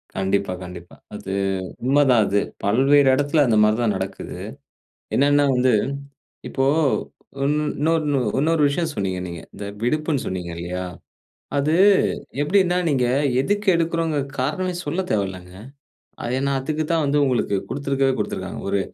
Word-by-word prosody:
கண்டிப்பா, 95 0 0
கண்டிப்பா. 90 -1 -10 0.2
அது 95 - -6 0.5
உண்மதான் 135 -3 +4
அது. 100 +1 +2 0.2
பல்வேறு 135 +7 +4
இடத்துல 145 +2 +2
அந்த 115 -3 +2
மாரி 105 0 +4
தான் 110 -3 +1
நடக்குது. 95 0 -6 0.8
என்னென்னா 145 +1 +4
வந்து 125 0 +3 0.8
இப்போ 135 - 0 0.8
இன் 145 - +2 0.3
இன்னொரு 160 +2 +2 0.4
இன்னொரு 160 +2 +2
விஷயம் 160 +3 -1
சொன்னீங்க 95 -2 -2
நீங்க. 85 -2 -7
இந்த 100 - -7 0.2
விடுப்புன்னு 150 +2 0
சொன்னீங்க 90 -2 -4
இல்லையா. 90 +2 -4 0.7
அது 150 +3 +1 0.7
எப்படின்னா 180 +3 +2
நீங்க 130 -5 +2 0.3
எதுக்கு 205 +6 -1
எடுக்கிறோம்ங்க 165 -2 0 0.2
காரணம் 175 +6 -2
சொல்ல 155 +5 -1
தேவையில்லங்க. 95 -3 -2 0.7
அது 120 +1 -2
ஏன்னா, 140 0 0
அதுக்கு 155 +3 -2
தான் 165 -1 +2
வந்து 145 +1 +1
உங்களுக்கு 120 -6 0
குடுத்திருக்கவே 135 -1 0
குடுத்திருக்காங்க - - -4
ஒரு 100 0 +1
135 Hz, 130 wpm, -22 LUFS, 100-155 Hz, 0.8 s, உண்மதான்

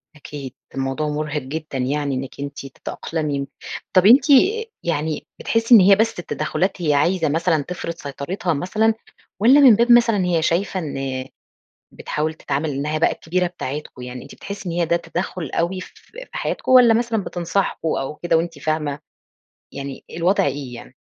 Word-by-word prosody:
أكيد، 140 -3 -8 0.2
الموضوع 135 +3 -2
مُرهِق 150 0 -2
جدًا 145 +1 -5
يعني 140 +1 -1
إنِك 135 +1 -6
أنتِ 140 0 -6
تتأقلمي، 145 +1 -4 0.5
طب 185 0 +5
أنتِ 255 +7 +7
آآ 420 - +5 0.2
يعني 155 -2 -2
بتحِسّي 230 +1 +4
إن 220 - +10
هي 195 +1 +7
بس 220 -2 0
التّدخُّلات 175 +3 -2
هي 150 -3 +2
عايزة 165 +2 +2
مثلًا 160 -1 +1
تفرض 170 0 -5
سيطرتها 165 +5 -3
مثلًا؟ 215 +9 +1 0.5
والّا 255 +7 +6
من 260 -6 +8
باب 235 +3 +3
مثلًا 230 -5 +5
هي 170 -2 +1
شايفة 180 +4 0
إن 135 -4 -4 0.6
بتحاول 155 +1 -3
تتعامل 150 0 -2
إنها 150 +3 -2
بقى 160 - +3
الكبيرة 180 +2 -1
بتاعتكم؟ 150 -6 -6
يعني 125 0 -7
أنتِ 140 - -12
بتحسي 200 -2 -7
إن - - -2
هي 170 -1 +1
ده 170 - +2
تدخّل 170 -3 -4
أوي 185 +2 -1
ف - - -7
ف - - -22
في - - -9
حياتكم؟ - - -2
والّا 245 -3 +8
مثلًا 225 -3 0
بتنصحكم 175 -1 -2
أو 145 -1 -2
كده 170 0 +1
وأنتِ 165 -2 -3
فاهمة؟ 150 -2 -2 0.7
يعني 140 -1 -7
الوضع 170 0 +1
إيه 135 -2 -3
يعني؟ 125 +2 -12
160 Hz, 170 wpm, -21 LUFS, 145-190 Hz, 0.7 s, إن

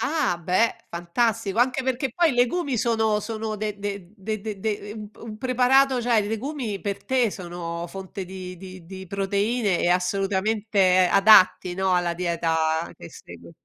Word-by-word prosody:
Ah, 295 - 0
beh, 185 +7 +1 0.2
fantastico, 195 +4 -1
anche 255 +2 +2
perché 260 0 -1
poi 340 -2 +3
i 245 - -3
legumi 255 +2 +1
sono 220 -2 +1
sono 215 0 -4
de 210 -1 -4
de 200 -2 -6
de 215 +1 -4
de 215 -2 -5
de 205 -1 -3
u 220 - -8
un 210 -1 -9
p - - -29
un 215 -2 -8
preparato, 255 +1 +3
cioè 235 -2 +3
i 205 - -3
legumi 225 -2 -3
per 200 -1 -3
te 255 -4 +2
sono 175 -2 -6
fonte 190 0 -7
di 185 -1 -8
di 185 -1 -11
di 190 +1 -9
proteine 200 +1 0
e - - +1
assolutamente 190 +1 +2
adatti, 195 -2 +6
no, 190 0 +1
alla 175 -1 +1
dieta 165 -2 -1
che 85 - -11
segui. - - -13
205 Hz, 170 wpm, -24 LUFS, 185-230 Hz, 0.2 s, adatti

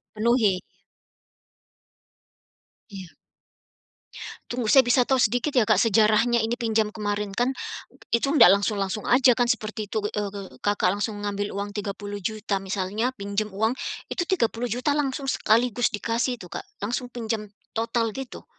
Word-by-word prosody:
dipenuhi. 215 -4 +2 2.3
Iya. 190 -5 -10 1.3
Tunggu, 240 -3 -2
saya 265 +2 +7
bisa 245 +1 +4
tahu 265 - +4
sedikit 245 +4 +2
ya 230 - +5
Kak, - - +3
sejarahnya 225 +2 +4
ini 225 +1 0
pinjam 220 -3 0
kemarin 205 -2 -3
kan, 245 +5 +1 0.6
itu 235 +4 +2
ndak 230 - +7
langsung-langsung 200 0 -1
aja 255 0 +6
kan 240 0 +1
seperti 215 -3 -2
itu. - - -3
Eee 210 -1 -2
eee, 195 -1 -10
Kakak 200 -2 +2
langsung 205 +1 -3
ngambil 205 0 -3
uang 200 +1 -4
Rp30.000.000 205 0 -3
misalnya, 195 +5 -1
pinjam 200 +1 -2
uang 220 +4 0 0.3
itu - - -3
Rp30.000.000 245 - 0
langsung 280 -1 -1
sekaligus 240 -2 +2
dikasih 235 +3 -1
itu 185 - -11
Kak, 175 - -6 0.2
langsung 245 +4 -3
pinjam 220 -3 -4 0.2
total 230 0 -1
gitu? 265 +1 -8
220 Hz, 135 wpm, -25 LUFS, 205-240 Hz, 2.3 s, saya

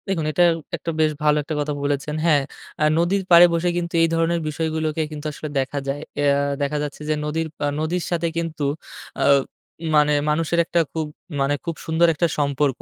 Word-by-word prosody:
দেখুন, 175 -5 -1
এটা 175 - +3 0.3
একটা 165 - -4
বেশ 155 -1 +3
ভালো 150 0 +4
একটা 155 +2 -4
কথা 150 0 -1
বলেছেন। 145 +1 -1
হ্যাঁ, 150 -4 +4 0.4
আ - - +4
নদীর 185 +4 +1
পাড়ে 170 +1 +10
বসে 170 +1 +1
কিন্তু 170 -1 -3
এই - - +5
ধরনের 165 +1 +1
বিষয়গুলোকে 160 0 -1
কিন্তু 150 0 -7
আসলে 155 +1 -7
দেখা 135 +2 -2
যায়। 140 +1 -2 0.2
এয়া 140 -1 +3 0.2
দেখা 145 +1 0
যাচ্ছে 145 0 -6
যে 155 - +2
নদীর 160 +2 -1
পা - - -2
নদীর 165 +3 -1
সাথে 170 -1 0
কিন্তু 165 -3 -3 0.6
আ - - +3 0.7
মানে 150 0 +4 0.2
মানুষের 165 +2 +1
একটা 170 - +1
খুব 160 -1 -1 0.4
মানে 140 +1 +2
খুব 170 - -3
সুন্দর 160 +1 +3
একটা 170 +3 +1
সম্পর্ক। 140 -2 0
155 Hz, 185 wpm, -22 LUFS, 145-170 Hz, 0.7 s, পাড়ে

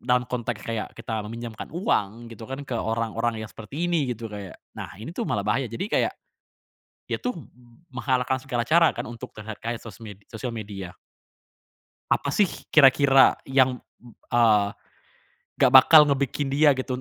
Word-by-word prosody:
dalam 125 0 +1
konteks 120 -3 -4
kayak 115 -2 -5
kita 115 -1 -4
meminjamkan 115 0 -7
uang 115 - -2
gitu 110 0 -11
kan 135 +2 -6
ke 130 - -8
orang-orang 115 +1 -1
yang 110 - -10
seperti 135 +9 -6
ini 170 -6 0
gitu 120 -2 -5
kayak 100 -3 -8 0.2
nah - - -7
ini 115 - -8
tuh 225 +5 -4
malah 100 -1 -1
bahaya 115 +5 0
jadi 115 - -4
kayak, - - +2 1.0
dia - - -1
tuh 250 - -3
m 150 -11 -12 0.5
menghalalkan 130 -1 0
segala 120 -2 -3
cara 165 +6 +4
kan - - -4
untuk 115 -1 -9
terlihat 110 0 -8
kaya 115 +1 -3
sosmed 105 -2 -11
sosial 115 +2 -5
media. 100 -4 -7 1.2
Apa 140 - +1
sih 205 - +3 0.3
kira-kira 135 -2 +6
yang 130 -1 +2 0.2
m 120 - -15 0.2
eee, 110 -4 +4 0.9
gak 130 - +4
bakal 150 +3 +9
ngebikin 140 0 -1
dia 145 +2 +4
gitu 130 -1 -3
120 Hz, 160 wpm, -25 LUFS, 110-135 Hz, 1.2 s, bakal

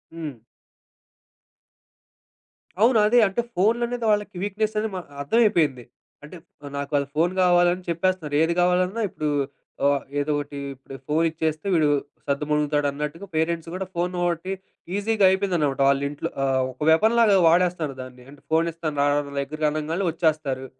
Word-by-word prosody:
హ్మ్. 150 -8 -7 2.4
అవును. 230 +2 +5
అదే 240 +3 +5
అంటే 195 +5 -1
ఫోన్లనేది 235 +5 +1
వాళ్ళకి 210 -2 -1
వీక్‌‌‌నెస్ 215 +2 -2
అనేది 215 0 -1
మ - - -2 0.2
అర్థమైపోయింది. 155 - +2 0.4
అంటే 150 +4 -11 0.4
నాకు 140 0 -4
వాళ్ళ 140 0 +2
ఫోను 170 +4 +2
గావాలని 175 0 +3
చెప్పేస్తున్నారు. 170 -3 -1
ఏది 165 +1 +1
గావాలన్నా 180 +4 +1
ఇప్పుడు 155 -3 -3 0.6
ఆహ్, 140 -1 +3 0.2
ఏదో 145 +1 -1
ఒకటి 145 0 -5 0.2
ఇప్పుడు 135 0 -12
ఫోన్ 155 +2 +1
ఇచ్చేస్తే 160 +2 -3
వీడు 160 -3 +3 0.4
సర్దుమణుగుతాడు 150 +1 0
అన్నట్టుగా 150 +6 -5
పేరెంట్స్ 165 +1 -1
గూడా 190 +1 -3
ఫోన్ 175 +1 -1
ఒకటి 175 +2 -2 0.4
ఈజీగా 205 0 +2
అయిపోయిందనమాట. 180 -8 0
వాళ్ళింట్లో. 140 +1 -1
ఆహ్, 135 -1 +1
ఒక 130 - -6
వెపన్ 220 +8 +4
లాగా 210 -4 +5
వాడేస్తారు 170 -4 +2
దాన్ని. 130 -1 -11
అంటే 145 - -16
ఫోనిస్తాను 160 -2 0
రా 145 - +3 0.3
దగ్గర 155 +3 -5
అనంగానే 155 +5 -2
వచ్చేస్తారు. 155 -5 -1
165 Hz, 135 wpm, -24 LUFS, 145-185 Hz, 2.4 s, అవును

